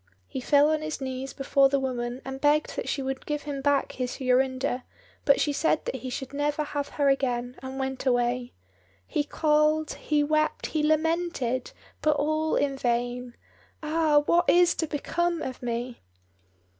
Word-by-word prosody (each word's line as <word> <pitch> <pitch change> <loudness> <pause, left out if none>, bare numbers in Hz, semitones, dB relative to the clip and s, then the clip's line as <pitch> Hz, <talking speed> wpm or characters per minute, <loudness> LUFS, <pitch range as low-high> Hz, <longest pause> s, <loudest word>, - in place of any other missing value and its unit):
He 260 - -6
fell 290 +3 +4
on 310 -1 0
his 310 -2 -4
knees 260 0 -4
before 275 0 +3
the 275 0 +2
woman 250 -1 -3
and 265 0 -6
begged 300 +1 +2
that - - -3
she 275 - -1
would 265 0 -4
give 295 -1 -2
him 285 -2 -4
back 285 0 +2
his 250 -1 -4
Jorinda, 255 0 +1 0.4
but 280 - +5
she 295 - +1
said 310 +1 +1
that - - -3
he 255 +1 -6
should 265 +2 -5
never 295 +1 0
have 290 -1 -3
her 285 -1 +3
again, 250 -2 0
and 265 0 -6
went 265 0 -3
away. 245 0 +1 0.5
He 290 - -1
called, 305 +1 +2
he 300 -1 0
wept, 310 +1 +1
he 310 - -1
lamented, 310 -5 0 0.3
but 305 -1 +3
all 310 +2 0
in 275 -1 0
vain, 245 0 -1 0.5
"Ah, 305 -1 +3
what 345 +3 +3
is 350 0 +5
to 320 - -2
become 335 +3 -1
of 255 - -6
me?" 240 0 -4
280 Hz, 170 wpm, -27 LUFS, 255-305 Hz, 0.5 s, but